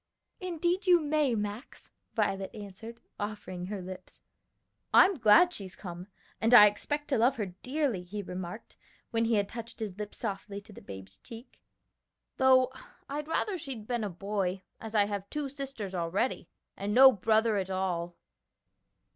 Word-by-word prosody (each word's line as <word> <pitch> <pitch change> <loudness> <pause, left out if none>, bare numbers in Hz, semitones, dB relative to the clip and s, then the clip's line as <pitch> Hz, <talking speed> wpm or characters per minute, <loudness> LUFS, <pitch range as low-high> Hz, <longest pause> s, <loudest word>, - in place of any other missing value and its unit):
"Indeed, 360 +1 -1
you 355 -1 +7
may, 300 -5 +1
Max," 210 +3 -6 0.2
Violet 195 -3 0
answered, 215 +3 -9 0.2
offering 205 -4 -5
her 200 -2 -5
lips. 185 0 -10 0.7
"I'm 375 -5 +6
glad 330 +11 +6
she's 190 -2 -8
come, 180 -1 -8 0.3
and 225 +2 +5
I 210 - +11
expect 290 +8 -1
to 265 -5 +2
love 245 +4 +4
her 215 - -2 0.2
dearly," 265 -7 -1
he 200 +3 -6
remarked, 180 +3 -7 0.4
when 230 -1 +2
he 225 0 +2
had 200 -1 +1
touched 230 +1 -8
his 210 -3 -5
lips 210 -1 -6
softly 200 -2 -4
to 210 - -15
the - - -12
babe's 95 0 -10
cheek, 230 +2 -12 0.8
"though 260 -1 +5 0.4
I'd 295 +1 -4
rather 365 +4 -1
she'd 250 -8 -6
been 240 -1 -2
a 205 - -2
boy, 190 0 -2 0.2
as 225 0 -7
I 205 -1 +5
have 200 -1 -4
two 295 -1 -3
sisters 270 -8 -6
already 180 +8 -1 0.3
and 205 +2 -3
no 265 +1 +10
brother 220 +1 +2
at 190 -1 -2
all." 175 -2 -2
215 Hz, 160 wpm, -30 LUFS, 195-260 Hz, 0.8 s, I